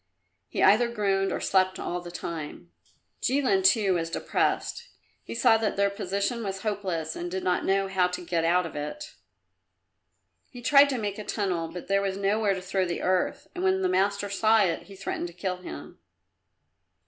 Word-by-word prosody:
He -, -, -1 dB
either 235 Hz, +4 st, +6 dB
groaned 195 Hz, -4 st, 0 dB
or -, -, -2 dB
slept 185 Hz, 0 st, +2 dB
all 175 Hz, 0 st, -3 dB
the 175 Hz, -, -9 dB
time. 160 Hz, -, -7 dB, 0.5 s
Jilin, 255 Hz, -7 st, +2 dB
too, 190 Hz, 0 st, +4 dB
was 165 Hz, -2 st, -1 dB
depressed; -, -, -1 dB, 0.3 s
he 115 Hz, -, -8 dB
saw 225 Hz, -, +5 dB
that 220 Hz, -2 st, -1 dB
their 200 Hz, 0 st, +2 dB
position 200 Hz, +5 st, -2 dB
was 195 Hz, -2 st, -4 dB
hopeless 185 Hz, -7 st, -2 dB
and 175 Hz, +1 st, -4 dB
did 185 Hz, +1 st, -4 dB
not 180 Hz, -1 st, 0 dB
know 195 Hz, 0 st, +2 dB
how 190 Hz, -2 st, +2 dB
to 180 Hz, 0 st, -6 dB
get 170 Hz, -1 st, 0 dB
out 175 Hz, +2 st, +3 dB
of 165 Hz, -, -8 dB
it. 150 Hz, -, -6 dB, 1.4 s
He 245 Hz, -, -11 dB
tried 280 Hz, +2 st, +6 dB
to 265 Hz, -, -1 dB
make 205 Hz, -2 st, -3 dB
a -, -, -5 dB
tunnel 185 Hz, -6 st, -2 dB
but 175 Hz, +2 st, -8 dB
there 195 Hz, 0 st, +2 dB
was 195 Hz, -1 st, -2 dB
nowhere 200 Hz, 0 st, +1 dB
to 185 Hz, -, -6 dB
throw 190 Hz, +1 st, 0 dB
the 170 Hz, -, -3 dB
earth, 185 Hz, +11 st, 0 dB
and 360 Hz, +1 st, -4 dB
when 380 Hz, 0 st, +2 dB
the 370 Hz, -, +2 dB
master 200 Hz, -, +1 dB
saw 215 Hz, +2 st, +3 dB
it, 170 Hz, -4 st, -2 dB
he 200 Hz, -, -11 dB
threatened 190 Hz, -2 st, -4 dB
to 170 Hz, -, -12 dB
kill 180 Hz, +1 st, -3 dB
him. 75 Hz, -, -9 dB
195 Hz, 190 wpm, -27 LUFS, 180-210 Hz, 1.4 s, either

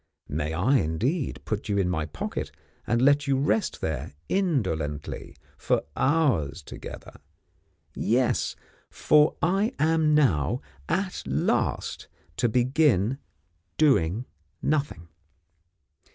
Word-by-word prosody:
May 75 Hz, +2 st, -2 dB
I, 125 Hz, +11 st, +3 dB
indeed, 120 Hz, -, -1 dB
put 110 Hz, 0 st, -3 dB
you 100 Hz, -, +1 dB
in 95 Hz, -2 st, +2 dB
my 80 Hz, -4 st, -1 dB
pocket 75 Hz, -, -4 dB, 0.4 s
and 115 Hz, +2 st, +2 dB
let 145 Hz, +1 st, +4 dB
you 135 Hz, -1 st, +2 dB
rest 150 Hz, +10 st, 0 dB
there, 75 Hz, -2 st, -3 dB
indolently, 95 Hz, -, -1 dB, 0.2 s
for -, -, +1 dB
hours 130 Hz, -, +1 dB
together? -, -, -10 dB, 0.7 s
Yes! -, -, +1 dB, 0.3 s
for 150 Hz, 0 st, +3 dB
I 195 Hz, +7 st, +1 dB
am 155 Hz, 0 st, +3 dB
now, 95 Hz, -, +2 dB, 0.3 s
at 190 Hz, 0 st, -1 dB
last, 70 Hz, +2 st, -1 dB, 0.3 s
to 120 Hz, -, +2 dB
begin 125 Hz, -, +2 dB, 0.6 s
doing 120 Hz, -, +3 dB, 0.3 s
Nothing. 140 Hz, -, -1 dB
125 Hz, 105 wpm, -26 LUFS, -, 0.7 s, let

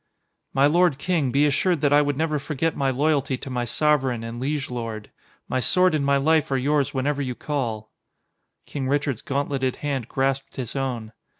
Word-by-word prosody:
"My 135 Hz, +1 st, +3 dB
lord 170 Hz, -1 st, +3 dB
king, 160 Hz, -3 st, 0 dB
be 140 Hz, +3 st, +3 dB
assured 155 Hz, +3 st, +1 dB
that 145 Hz, -1 st, +3 dB
I 145 Hz, -, +6 dB
would 145 Hz, -2 st, -1 dB
never 155 Hz, -1 st, 0 dB
forget 150 Hz, +3 st, -2 dB
my 135 Hz, -1 st, +1 dB
loyalty 140 Hz, 0 st, +1 dB
to 135 Hz, -, -8 dB
my 125 Hz, -1 st, -1 dB
sovereign 130 Hz, -2 st, +1 dB
and 115 Hz, +1 st, -6 dB
liege 140 Hz, +2 st, -2 dB
lord. 115 Hz, -3 st, -5 dB, 0.4 s
My 130 Hz, -, 0 dB
sword 180 Hz, +7 st, +3 dB
and 150 Hz, -2 st, +1 dB
my 140 Hz, 0 st, +3 dB
life 155 Hz, +2 st, +2 dB
are 135 Hz, -, +1 dB
yours 140 Hz, +1 st, +1 dB
whenever 145 Hz, +2 st, -1 dB
you 125 Hz, -3 st, -3 dB
call." 115 Hz, -8 st, -3 dB, 0.7 s
King 135 Hz, -3 st, -4 dB
Richard's 140 Hz, -4 st, 0 dB
gauntleted 135 Hz, -2 st, -1 dB
hand 135 Hz, -5 st, -3 dB
grasped 135 Hz, +1 st, -1 dB
his 125 Hz, -2 st, -5 dB
own. 125 Hz, -5 st, -3 dB
140 Hz, 185 wpm, -24 LUFS, 130-150 Hz, 0.7 s, I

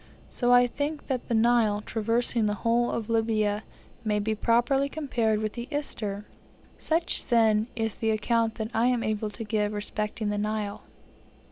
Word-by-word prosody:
So 245 Hz, -1 st, +1 dB
I 245 Hz, 0 st, +7 dB
think 290 Hz, +5 st, -3 dB
that 260 Hz, -3 st, -3 dB
the 235 Hz, -, 0 dB
Nile, 220 Hz, -2 st, +3 dB
traversing 230 Hz, +1 st, 0 dB
the 210 Hz, -, 0 dB
whole 235 Hz, +1 st, +3 dB
of 225 Hz, -2 st, -3 dB
Libya, 220 Hz, -2 st, +1 dB, 0.4 s
may 210 Hz, -2 st, +1 dB
be 215 Hz, +1 st, 0 dB
properly 240 Hz, +5 st, +2 dB
compared 245 Hz, -8 st, 0 dB
with 215 Hz, -1 st, -2 dB
the 235 Hz, 0 st, -6 dB
Ister. 215 Hz, -9 st, -3 dB, 0.5 s
Such, 330 Hz, +1 st, +1 dB
then, 220 Hz, -2 st, +3 dB
is 225 Hz, -2 st, -1 dB
the 225 Hz, -, 0 dB
account 225 Hz, +1 st, +1 dB
that 220 Hz, +1 st, -4 dB
I 230 Hz, +2 st, +2 dB
am 245 Hz, -2 st, +1 dB
able 215 Hz, 0 st, -1 dB
to 215 Hz, +2 st, -7 dB
give 210 Hz, -1 st, -1 dB
respecting 210 Hz, +1 st, -3 dB
the 205 Hz, -, -1 dB
Nile. 210 Hz, -1 st, -2 dB
225 Hz, 165 wpm, -27 LUFS, 215-240 Hz, 0.5 s, I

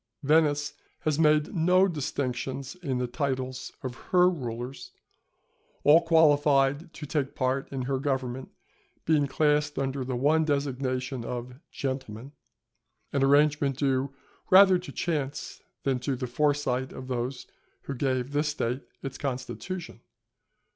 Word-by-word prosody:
Venice 145 Hz, 0 st, +3 dB, 0.3 s
has 155 Hz, -1 st, 0 dB
made 150 Hz, -1 st, +3 dB
no 180 Hz, +3 st, +4 dB
distinction 135 Hz, -4 st, -3 dB, 0.2 s
in 135 Hz, -7 st, -1 dB
the 125 Hz, -, 0 dB
titles 130 Hz, 0 st, -3 dB
of 130 Hz, -2 st, -3 dB, 0.2 s
her 180 Hz, -1 st, +5 dB
rulers, 130 Hz, -, -4 dB, 0.9 s
all 155 Hz, +3 st, +7 dB
qualified 145 Hz, -2 st, +3 dB
to 150 Hz, -, -7 dB
take 140 Hz, -2 st, -2 dB
part 130 Hz, +1 st, -1 dB
in 135 Hz, -2 st, -3 dB
her 135 Hz, +1 st, -1 dB
government 130 Hz, -2 st, -2 dB, 0.6 s
being 150 Hz, -3 st, +3 dB
classed 150 Hz, +1 st, +1 dB
under 135 Hz, 0 st, -1 dB
the 125 Hz, 0 st, -3 dB
one 150 Hz, +6 st, +3 dB
designation 130 Hz, -3 st, -1 dB
of 125 Hz, +2 st, -6 dB
"Gentlemen," 130 Hz, -2 st, -5 dB, 0.8 s
an 140 Hz, -, +1 dB
arrangement 145 Hz, -1 st, +3 dB
due 135 Hz, -1 st, +1 dB, 0.4 s
rather 190 Hz, -1 st, +7 dB
to 180 Hz, -, -9 dB
chance 145 Hz, -5 st, -3 dB, 0.2 s
than 135 Hz, -2 st, +1 dB
to 130 Hz, +2 st, -2 dB
the 125 Hz, 0 st, -4 dB
foresight 130 Hz, -1 st, 0 dB
of 130 Hz, -, -8 dB
those 125 Hz, +1 st, -3 dB, 0.4 s
who 140 Hz, -, -4 dB
gave 130 Hz, 0 st, -1 dB
this 145 Hz, +1 st, +1 dB
State 130 Hz, -3 st, -2 dB, 0.2 s
its 135 Hz, -1 st, -6 dB
constitution. 150 Hz, +7 st, -5 dB
140 Hz, 130 wpm, -27 LUFS, 130-150 Hz, 0.9 s, all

